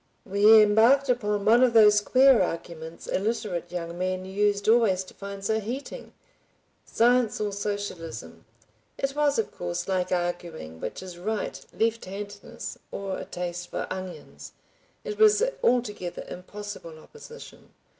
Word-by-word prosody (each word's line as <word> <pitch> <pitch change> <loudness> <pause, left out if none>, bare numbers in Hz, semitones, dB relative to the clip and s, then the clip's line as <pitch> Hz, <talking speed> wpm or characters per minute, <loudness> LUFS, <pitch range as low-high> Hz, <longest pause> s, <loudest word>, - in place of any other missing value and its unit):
We 210 +2 +7
embarked 230 +7 +4
upon 210 -5 0
one 230 +3 +6
of 250 -2 +4
those 210 -2 +7
queer 260 +3 +5
arguments 165 -2 -5
illiterate 200 -5 -2
young 170 -1 -5
men 185 0 -2
used 200 +1 0
always 220 -5 +4
to 185 - -15
find 200 0 -8
so 220 +1 +1
heating. 245 +7 -6 0.7
Science 240 -1 +2
or 210 -1 -1
Socialism? 170 - -5 0.5
It 275 0 -2
was, 295 -1 +2
of 225 - -1
course, 85 0 -4
like 185 -1 -1
arguing 175 - -3
which - - -6
is 180 -2 -9
right, 215 +4 -3
left 225 0 0
handedness 200 +1 -8
or 195 -1 -4
a - - -6
taste 175 0 -5
for - - -3
onions, 185 -1 -8 0.5
it 435 -3 -6
was 430 0 +6 0.2
altogether 215 - 0
impossible 185 -3 -8
opposition. 460 - -13
205 Hz, 135 wpm, -26 LUFS, 180-230 Hz, 0.7 s, We